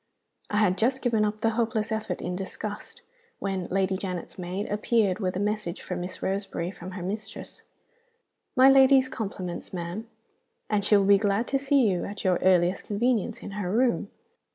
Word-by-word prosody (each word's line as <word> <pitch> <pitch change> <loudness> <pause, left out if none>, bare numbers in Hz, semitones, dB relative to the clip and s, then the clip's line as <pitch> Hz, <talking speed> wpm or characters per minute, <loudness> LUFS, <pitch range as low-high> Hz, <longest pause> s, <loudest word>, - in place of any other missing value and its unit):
I 210 - -1
had 200 -3 +3
just 260 +4 +1
given 230 -4 +2
up 210 0 -3
the 225 - +2
hopeless 225 -1 -1
effort 220 0 -3
in 180 - -2
disgust, 210 - -6 0.3
when 195 -2 -3
Lady 190 0 +1
Janet's 185 -1 -5
maid 180 +3 -3
appeared 210 -2 +1
with 185 -3 -1
a - - -1
message 210 -3 -2
for 180 - -4
Miss 180 +1 -5
Roseberry 190 -3 -2
from 185 -1 -9
her 185 -2 -6
mistress: 210 +3 -6 0.9
'My 260 0 +7
lady's 270 -1 +6
compliments, 195 -7 -5
ma'am, 180 +5 -5 0.6
and 205 -1 +2
she 205 +1 +5
will 200 - +2
be 200 0 +6
glad 205 +2 +1
to 275 - +1
see 275 -3 +3
you 185 -3 0
at 205 0 -6
your 185 -2 +3
earliest 180 0 +3
convenience, 230 +1 0
in - - -7
her 200 -3 -3
room. 235 +5 +1
205 Hz, 175 wpm, -27 LUFS, 185-225 Hz, 0.9 s, My